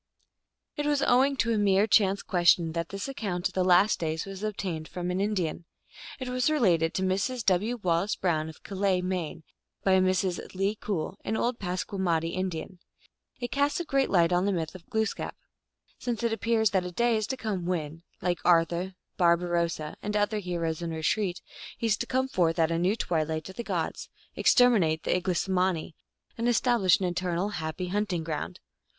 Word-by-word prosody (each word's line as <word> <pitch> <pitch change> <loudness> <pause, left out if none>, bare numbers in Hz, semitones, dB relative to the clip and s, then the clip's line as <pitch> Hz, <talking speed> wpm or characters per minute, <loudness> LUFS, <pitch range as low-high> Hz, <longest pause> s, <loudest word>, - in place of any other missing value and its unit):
It 295 0 -1
was 290 -1 +2
owing 270 +3 +3
to 230 -1 +2
a 215 - +1
mere 200 0 +4
chance 200 -2 +3
question 175 -3 +3
that 170 0 -3
this 195 +4 -5
account 200 -10 -2
of - - -17
the 185 - +1
Last 185 +3 +4
Day 160 -1 -1
was 195 -1 -8
obtained 190 -7 -3
from 180 0 -4
an 185 +2 -1
Indian. 185 -5 -1 0.5
It 260 - -5
was 250 +2 +1
related 180 - +2
to 190 - 0
Mrs. 200 +6 -1
W. 205 +6 +2
Wallace 175 +3 +1
Brown, 160 -4 0
of 160 - -13
Calais, 195 -2 0
Maine, 175 -3 -3 0.4
by 190 -1 +4
Mrs. 185 0 0
Le 195 +2 +1
Cool, 195 -3 -3
an 220 - -1
old 240 0 -1
Passamaquoddy 180 -3 -1
In 185 0 -1
dian. 175 +2 -7 0.6
It 245 -1 -4
casts 285 +5 +1
a 345 - -3
great 275 -3 +1
light 175 -2 +3
on 180 +2 +2
the - - +2
myth 165 -4 -2
of 185 -2 -13
Glooskap, 220 0 -2 0.6
since 240 -2 -3
it 230 -1 +1
appears 225 -1 +1
that 190 -2 +2
a 180 - -5
day 235 +5 +2
is 215 -1 -1
to 265 - -3
come 195 -7 -3
when, 165 -3 -3 0.2
like 175 -1 0
Ar 165 -2 +5
thur, 175 +3 -4 0.2
Barbarossa, 170 -3 +1
and 210 +1 -1
other 210 +1 +1
heroes 170 -4 -3
in 170 - -3
retreat, 175 +4 -1 0.3
he - - -3
is 215 -2 +2
to - - -4
come 260 0 +1
forth 170 -8 +1
at 165 -1 +2
a 165 - 0
new 185 +5 +2
twilight 160 -6 -1
of 190 - -10
the 235 - -4
gods, - - -3 0.3
exterminate 195 -11 +4
the - - +1
Iglesmani, 180 -1 0 0.5
and 235 +1 +1
establish 235 -6 +3
an 190 - -1
eternal 175 +2 -1
happy 170 -1 -4
hunt 205 +2 -1
ing 170 -2 -1
ground. 160 +3 -4
185 Hz, 190 wpm, -28 LUFS, 170-215 Hz, 0.6 s, Ar